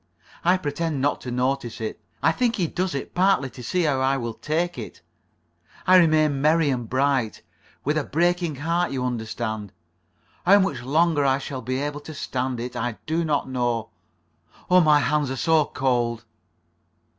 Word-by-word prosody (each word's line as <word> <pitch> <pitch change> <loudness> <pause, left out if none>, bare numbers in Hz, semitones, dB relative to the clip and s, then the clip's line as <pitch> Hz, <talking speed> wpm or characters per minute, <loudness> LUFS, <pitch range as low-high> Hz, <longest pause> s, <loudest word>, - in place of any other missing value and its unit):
I 180 +2 +4
pretend 150 -2 -2
not 145 +2 0
to 125 - -6
notice 125 -1 -1
it. 110 -1 -5 0.2
I 160 - +5
think 235 +5 0
he 180 - 0
does 180 0 -2
it 140 - -5
partly 180 -8 +2
to 125 - -11
see 180 +9 0
how 145 -4 +1
I 135 +1 +2
will 115 -3 -4
take 170 +7 -2
it. - - -8 0.9
I 185 0 +7
remain 155 -5 +3
merry 155 0 +3
and 120 -4 -3
bright. 130 -4 0 0.4
With 150 +2 +1
a - - -2
breaking 175 0 0
heart, 170 +5 0
you 130 -2 -2
understand. 110 -3 -4 0.7
How 195 +3 +7
much 195 -8 0
longer 155 +3 +2
I 135 -1 +3
shall 135 -1 -6
be 130 +2 -2
able 145 +1 -3
to 155 +1 -10
stand 130 -2 -3
it, 125 +1 -5
I 120 -1 -2
do 165 +2 0
not 150 -4 0
know. 120 -3 -1 0.8
Oh, 180 0 +7
my 150 -2 +5
hands 150 -2 +1
are 130 - -2
so 160 +2 +3
cold." 120 -4 -1
140 Hz, 175 wpm, -24 LUFS, 125-165 Hz, 0.9 s, I